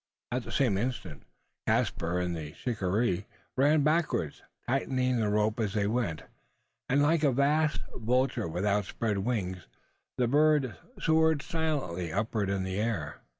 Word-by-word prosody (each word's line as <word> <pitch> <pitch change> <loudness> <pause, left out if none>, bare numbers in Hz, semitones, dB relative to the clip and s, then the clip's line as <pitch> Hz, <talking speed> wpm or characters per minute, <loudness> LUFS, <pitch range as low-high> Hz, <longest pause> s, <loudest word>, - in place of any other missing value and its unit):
At 125 0 -2
the - - -7
same 115 -8 +2
instant, 100 - -3 0.5
Caspar 85 +2 +1
and 90 -1 -1
the 75 -2 -6
shikaree 105 -3 -1 0.3
ran 145 +3 +4
backward 155 +2 +1 0.3
tightening 130 -1 +1
the 110 -2 +1
rope 105 +2 +1
as 105 -2 -1
they 105 -1 +2
went; 105 -8 -1 0.7
and 140 +2 +4
like 160 +1 +3
a 140 - +5
vast 150 +4 +2
vulture 125 -1 +1
with 90 +4 -2
outspread 105 +1 0
wings, 95 -5 -2 0.5
the 125 - +2
bird 145 -1 +3 0.2
soared 160 -2 +3
silently 145 - -2
upward 105 +1 -1
into 100 -1 0
the 95 +2 -2
air. 105 -10 -2
115 Hz, 145 wpm, -29 LUFS, 95-140 Hz, 0.7 s, a